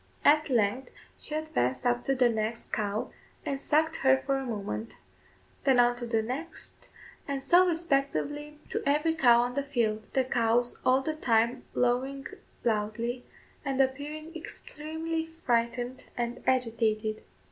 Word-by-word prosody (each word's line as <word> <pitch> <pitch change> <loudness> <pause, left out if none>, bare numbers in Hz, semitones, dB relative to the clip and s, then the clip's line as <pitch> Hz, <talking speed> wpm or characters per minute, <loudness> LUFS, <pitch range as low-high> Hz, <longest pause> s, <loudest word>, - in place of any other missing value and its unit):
At 300 +1 +5
length 245 +1 +1 0.3
she 305 - -3
advanced 130 - -1
up 245 0 +2
to 270 - +2
the 250 -1 +5
next 225 0 -2
cow, 210 0 -1 0.3
and 275 -1 -2
sucked 315 +2 +2
her 265 0 +5
for 275 +1 -1
a 270 - -3
moment; 155 - -4 0.7
then 265 -3 +4
on 245 0 +5
to 240 -1 -4
the 225 -1 +1
next, 275 +9 -6 0.4
and 275 -1 -2
so 360 +4 +6
respectively 295 -2 -1
to - - -1
every 300 +3 +2
cow 240 -7 +5
on 245 0 -2
the 280 - 0
field 230 -6 0
the 265 - +3
cows 240 -1 +1
all 260 +1 +4
the 310 +4 -2
time 235 -5 +1
lowing 260 +3 0 0.4
loudly, 230 +2 -1 0.4
and 275 -2 -2
appearing 295 +5 -1
extremely 320 0 -4
frightened 250 -5 -1
and 240 0 -2
agitated. 225 -4 +1
255 Hz, 145 wpm, -29 LUFS, 235-295 Hz, 0.7 s, so